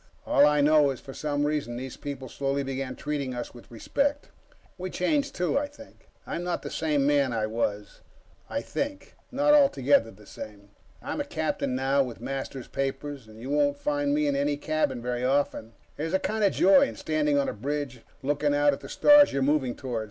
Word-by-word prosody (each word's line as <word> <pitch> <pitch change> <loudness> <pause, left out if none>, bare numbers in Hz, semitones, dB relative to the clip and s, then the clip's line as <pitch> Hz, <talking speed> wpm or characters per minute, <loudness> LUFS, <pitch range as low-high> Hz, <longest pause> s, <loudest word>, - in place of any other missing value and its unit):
All 145 - +5
I 150 0 +3
know 150 0 +5
is, 135 - -4
for 135 - -10
some 145 0 -1
reason 145 -5 -2
those 130 0 -6
people 140 -2 -6
slowly 140 +2 -2
began 135 -1 -4
treating 140 -3 -3
us 120 -1 -5
with 120 - -14
respect. 280 - -1 0.5
We 185 +1 -4
changed, 280 - 0
too, 180 +9 +1
I 290 - -3
think 285 -1 -16 0.2
I'm 170 - -4
not 175 -1 -2
the - - -6
same 150 -3 +1
man 140 -2 +3
I 110 -2 0
was... 105 -2 -3 0.5
I - - -2
think 290 +1 -4 0.2
not 290 +3 +3
altogether 140 - +4
the 105 -1 -16
same; 100 -1 -10 0.3
I'm - - -3
a - - -1
captain 125 - -2
now, 135 +2 +2
with 125 -4 -4
master's 135 -1 -5
papers, 135 -1 -4
and 110 0 -14
you 130 +4 -6
won't 145 -1 +2
find 145 0 0
me 150 +1 +2
in 145 - +1
my 140 +1 +1
cabin 145 -4 -1
very 125 0 -2
often... 135 -4 0 0.2
there's 160 +4 -1
a - - +3
kind 220 +2 -1
of 200 - +4
joy 270 +9 +6
in - - -7
standing 150 -2 0
on 140 - +1
a - - -2
bridge, 135 +2 -4 0.2
looking 145 +1 +1
out 145 0 +4
at - - -5
the - - -10
stars 290 0 +6
you're 140 - 0
moving 135 -3 +1
toward. 125 -4 -4
145 Hz, 205 wpm, -27 LUFS, 130-155 Hz, 0.5 s, joy